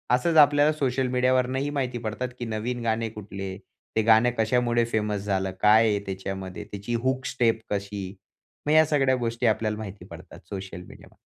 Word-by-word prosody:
असंच 160 +6 +1
आपल्याला 145 0 +6
social 135 -3 0
media 125 0 +2
वरनं 130 0 +1
ही 140 +2 -1
माहिती 130 -4 -2
पडतात 115 +2 -4
की 120 - -3
नवीन 115 +2 -3
गाणे 115 0 0
कुठले? 100 -3 -7 0.4
ते 110 - +3
गाणं 110 +2 +5
कशामुळे 120 +1 +2
फेमस 105 -3 -1
झालं? 95 -2 -1
काय 110 +2 +6
आहे 105 -1 +1
त्याच्यामध्ये 95 0 -5
त्याची 100 +4 -5
हूक 130 0 0
स्टेप 115 -3 +1
कशी? 100 -1 -4 0.5
मग 150 - +1
या 155 0 +7
सगळ्या 135 -3 +2
गोष्टी 115 -1 -2
आपल्याला 110 -1 0
माहिती 100 -4 -8
पडतात 85 0 -12
सोशल 95 -3 -6
मीडियामध्ये. - - -15
115 Hz, 175 wpm, -26 LUFS, 100-125 Hz, 0.5 s, या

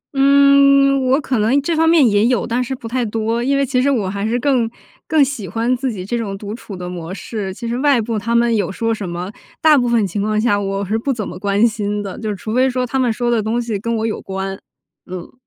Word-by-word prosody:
嗯， 275 0 +5
我 270 +3 +4
可 260 -5 -1
能 230 +7 +3
这 330 +3 0
方 325 +1 +3
面 320 -7 +5
也 205 +1 +3
有， 250 0 +1
但 245 +2 -1
是 265 +2 -4
不 235 -3 -9
太 250 +2 -1
多， 225 +1 -1
因 275 +2 +1
为 275 - +2
其 255 -1 0
实 280 - +2
我 225 -9 0
还 200 +1 -4
是 240 +2 0
更 250 -4 +1 0.4
更 310 -4 +4
喜 250 -8 -5
欢 230 +7 0
自 255 0 -2
己 185 -3 -6
这 240 - -3
种 200 -3 -4
独 205 +1 -7
处 220 -3 -9
的 180 0 -6
模 175 -1 -6
式， 200 0 -5
其 230 +5 -7
实 235 - -2
外 280 -3 +3
部 220 -1 -2
他 230 +3 -2
们 235 -1 +3
有 205 -2 -1
说 225 +3 -1
什 200 -5 -5
么， 175 +3 -5 0.3
大 315 -1 +5
部 245 -3 +2
分 230 -3 +2
情 200 +2 -3
况 215 +1 0
下 210 -2 +2
我 195 0 -2
是 220 +4 -1
不 275 +4 -1
怎 220 -5 -3
么 180 +1 -8
关 200 +2 +2
心 210 -1 -3
的， 195 -2 -7
就 220 -1 -4
是 205 - -2
除 215 +3 -6
非 255 +2 +3
说 250 0 -1
他 265 +2 -2
们 245 -3 +2
说 240 +1 -1
的 230 -2 +2
东 220 +3 -1
西 225 -4 -3
跟 230 +2 -2
我 220 0 -1
有 220 - -3
关。 195 0 -5 0.5
嗯。 180 -1 -8
230 Hz, 285 characters per minute, -18 LUFS, 205-255 Hz, 0.5 s, 嗯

